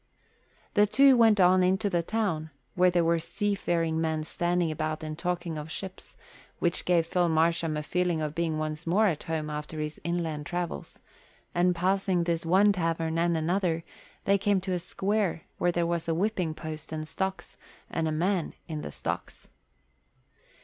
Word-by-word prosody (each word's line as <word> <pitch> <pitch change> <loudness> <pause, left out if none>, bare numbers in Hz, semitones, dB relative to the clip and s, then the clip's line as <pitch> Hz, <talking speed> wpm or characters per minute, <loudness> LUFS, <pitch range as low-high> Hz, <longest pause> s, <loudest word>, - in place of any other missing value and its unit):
The 205 0 +5
two 270 +5 +6
went 225 -3 +5
on 185 0 +6
into 190 +3 +2
the 175 -4 +1
town, 170 -5 -1 0.2
where 180 0 +4
there 175 -1 +2
were 165 0 +2
seafaring 170 -3 -1
men 160 -1 0
standing 175 +1 0
about 155 +1 -3
and 155 0 -4
talking 175 -1 -2
of 150 +1 -7
ships, 190 +3 -8 0.4
which 170 0 0
gave 170 -2 +3
Phil 175 +1 +1
Marsham 165 -1 +2
a 150 - -3
feeling 180 0 0
of 150 -1 -2
being 165 -1 -1
once 155 +1 -4
more 200 +6 +4
at 170 -8 +1
home 155 -2 -1
after 150 +1 -5
his 150 0 -4
inland 160 -3 -2
travels; 175 -1 -4 0.6
and 180 +1 +3
passing 185 0 +1
this 170 0 -1
one 195 +4 +5
tavern 165 -3 -1
and 170 0 +2
another, 165 0 0 0.4
they 200 0 +3
came 200 0 +2
to 190 0 -2
a 180 - 0
square 190 -1 -1 0.2
where 175 - +3
there 170 0 0
was 170 -1 -1
a 165 - +1
whipping 180 -4 0
post 155 -1 -7
and 155 -1 -3
a - - -7
stocks, 190 +4 -4 0.3
and 160 -1 -1
a - - 0
man 175 +3 0
in 155 -3 -4
the - - -5
stocks. - - -5
170 Hz, 175 wpm, -28 LUFS, 160-185 Hz, 0.6 s, two